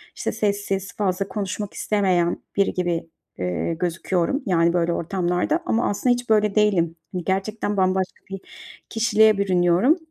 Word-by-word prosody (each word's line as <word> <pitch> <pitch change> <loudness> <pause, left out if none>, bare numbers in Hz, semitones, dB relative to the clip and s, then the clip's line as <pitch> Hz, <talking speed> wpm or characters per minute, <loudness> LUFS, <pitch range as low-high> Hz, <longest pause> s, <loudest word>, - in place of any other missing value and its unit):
işte, - - -2
sessiz, 200 -2 -2
fazla 195 -1 0
konuşmak 205 0 -4
istemeyen 185 -5 +1 0.2
biri 200 -1 +2
gibi, 175 -2 -2 0.3
ııı, 90 - -1
gözüküyorum 180 - -1
yani 170 -2 +2
böyle 170 -1 +1
ortamlarda 180 - 0
ama 230 +2 +1
aslında 245 +5 +2
hiç 245 -1 -5
böyle 210 -1 +3
değilim. 185 -6 +2 0.2
Hani, 180 -2 -4
gerçekten 205 +2 -2
bambaşka 185 0 0
bir 195 0 -6 0.5
kişiliğe 220 -2 +4
bürünüyorum. 185 - +3
195 Hz, 135 wpm, -23 LUFS, 175-210 Hz, 0.5 s, kişiliğe